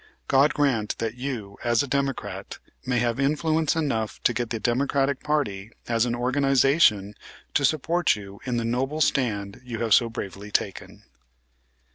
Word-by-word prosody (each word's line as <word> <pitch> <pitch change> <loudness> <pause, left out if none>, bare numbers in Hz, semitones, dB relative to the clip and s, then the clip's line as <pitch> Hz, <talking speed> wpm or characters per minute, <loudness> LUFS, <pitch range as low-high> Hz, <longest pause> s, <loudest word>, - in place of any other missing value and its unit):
God 135 +3 +4
grant 130 -8 +1
that 115 -1 -2
you, 120 -6 -6
as 120 +2 +2
a - - -5
Democrat, 140 0 -3 0.3
may 125 -1 +1
have 120 +1 0
influence 155 +3 +1
enough 135 -9 -1
to 120 - +3
get 120 -1 -2
the 115 - -3
Democratic 135 +3 +1
party 115 -10 -1 0.2
as 115 0 +1
an 120 - -1
organization 130 - +3 0.4
to 145 - +2
support 160 +4 +2
you 100 -1 -10
in 125 -2 -2
the 115 - -1
noble 135 +6 -1
stand 105 -9 0
you 120 -2 -5
have 115 -2 +2
so 120 +1 +5
bravely 100 -2 -7
taken." 100 -1 -3
125 Hz, 155 wpm, -25 LUFS, 110-140 Hz, 0.4 s, so